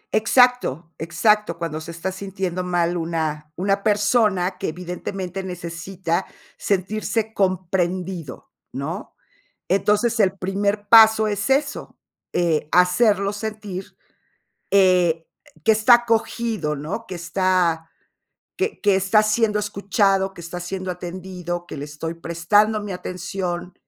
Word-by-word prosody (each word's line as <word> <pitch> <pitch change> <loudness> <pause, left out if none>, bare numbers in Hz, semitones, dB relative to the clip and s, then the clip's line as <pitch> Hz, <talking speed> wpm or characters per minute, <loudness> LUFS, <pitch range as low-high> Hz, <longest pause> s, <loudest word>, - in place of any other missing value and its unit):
Exacto 230 - +3
exacto, 210 +5 +1
cuando 160 -2 -4
se 165 - -9
está 170 +3 -4
sintiendo 190 -2 -4
mal 175 -1 0
una 160 -2 -3
una 195 +2 0
persona 205 -3 +2
que - - -2
evidentemente 180 +2 -5
necesita 175 -1 -4 0.3
sentirse 215 +3 -1
comprendido, 185 -3 -2 0.2
¿no? 160 - -5 0.5
Entonces, 210 +5 +2
el 195 -2 +3
primer 200 +2 -1
paso 220 -1 +7
es 205 +4 -1
eso, 285 +2 -1 0.3
eh, 165 -4 +1
hacerlo 200 +3 +3
sentir, 210 -3 -6 0.8
eh, 180 -4 +3 0.4
que 225 - +6
está 220 +3 +6
acogido, 225 -8 0
¿no? 160 +11 -5
Que 185 - -5
está 175 -2 0 0.7
que 405 +3 -2
que 205 -2 +4
está 195 +3 +4
siendo 215 0 +1
escuchado, 195 -1 +1
que 170 - -11
está 170 +1 -6
siendo 185 +1 -5
atendido, 175 -1 -5
que - - -7
le 145 - -5
estoy 160 +3 -6
prestando 205 +6 +2
mi 205 -2 -5
atención, 180 0 -4
185 Hz, 120 wpm, -22 LUFS, 175-210 Hz, 0.8 s, paso